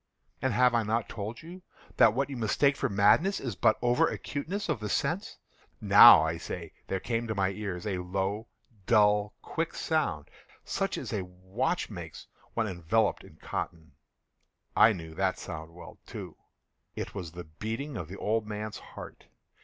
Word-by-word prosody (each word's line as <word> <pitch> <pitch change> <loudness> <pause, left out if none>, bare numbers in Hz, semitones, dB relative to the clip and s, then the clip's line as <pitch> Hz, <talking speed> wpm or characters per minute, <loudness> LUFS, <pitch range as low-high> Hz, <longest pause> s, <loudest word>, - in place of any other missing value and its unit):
And 130 0 +1
have 125 +2 +4
I 115 - +3
not 110 +2 -1
told 110 +5 -6
you 175 +3 -10 0.4
that 110 -1 +6
what 135 +1 +1
you - - -4
mistake 125 +5 +2
for - - -1
madness 105 - +4
is 120 -7 -4
but 110 - +3
over 120 0 +4
acuteness 180 +9 -4
of - - -1
the 105 -1 -4
sense?—now, - - +5
I 80 +1 -1
say, 85 -1 -7
there 95 - -1
came 115 +3 -2
to 110 - -2
my 95 -1 +2
ears 95 -3 -5
a 95 -4 -1
low, 95 +4 -2 0.4
dull, 105 -1 +4
quick 165 0 -3
sound, 90 - -1 0.4
such - - -1
as - - -5
a 100 - -1
watch 95 - -3
makes 85 -6 -8 0.3
when 115 - +1
enveloped 95 +3 0
in - - -15
cotton. 80 -3 -5 0.8
I 115 - +7
knew 80 -5 -6
that 95 +2 0
sound 80 -2 -7
well, 90 - -12
too. - - -8 0.6
It - - -5
was 90 -5 -6
the 90 0 -7
beating 110 - -5
of 85 -7 -5
the 95 +4 -8
old 110 0 0
man's 105 0 -5
heart. - - -11
105 Hz, 170 wpm, -29 LUFS, 90-120 Hz, 0.8 s, I